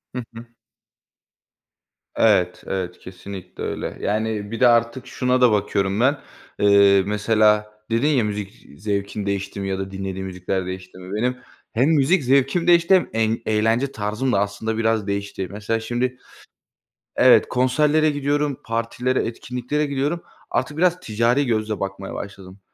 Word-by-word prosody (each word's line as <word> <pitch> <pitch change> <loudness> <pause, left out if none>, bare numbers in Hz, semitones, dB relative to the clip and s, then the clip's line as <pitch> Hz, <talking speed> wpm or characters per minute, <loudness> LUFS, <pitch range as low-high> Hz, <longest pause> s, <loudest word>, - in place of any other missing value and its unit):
Hı 125 - -3
hı. 115 +1 -9 1.7
Evet, 90 0 +2
evet, 90 -2 -4
kesinlikle 95 0 -9
öyle, - - -4
yani, 105 0 -2
bir 115 - -4
de 125 - +6
artık 115 +2 +2
şuna 125 0 0
da 125 -2 +6
bakıyorum 100 -1 0
ben. 135 +4 +3 0.4
Eee, 100 -1 +5
mesela, 105 0 +2 0.2
dedin 115 +6 +2
ya, 140 -6 +3
müzik 105 -2 -5 0.2
zevkin 100 0 -2
değişti 100 0 -3
mi 100 - -3
ya 95 0 -2
da 95 0 -5
dinlediğin 95 0 -5
müzikler 95 0 -3
değişti 95 0 -8
mi? 95 +2 -7
Benim 125 +4 0 0.4
hem 125 +6 +3
müzik 160 +2 +3
zevkim 140 +6 +2
değişti 170 +2 +6
hem 185 - +1
en 110 0 0
eğlence 115 +5 +1
tarzım 105 +5 -2
da 100 - +2
aslında 100 +2 -2
biraz 110 -2 +1
değişti. 100 -1 -3
Mesela 105 +2 -2
şimdi, 120 +3 -2 1.0
evet, - - +6
konserlere 150 +5 +2
gidiyorum, 145 -1 -1
partilere, 115 +3 -1
etkinliklere 125 +5 -3
gidiyorum, 145 +4 -2 0.3
artık 145 +3 -1
biraz 180 +1 +2
ticari 120 0 +1
gözle 110 -3 -1
bakmaya 100 0 -5
başladım. 95 -1 -9
110 Hz, 145 wpm, -22 LUFS, 100-130 Hz, 1.7 s, de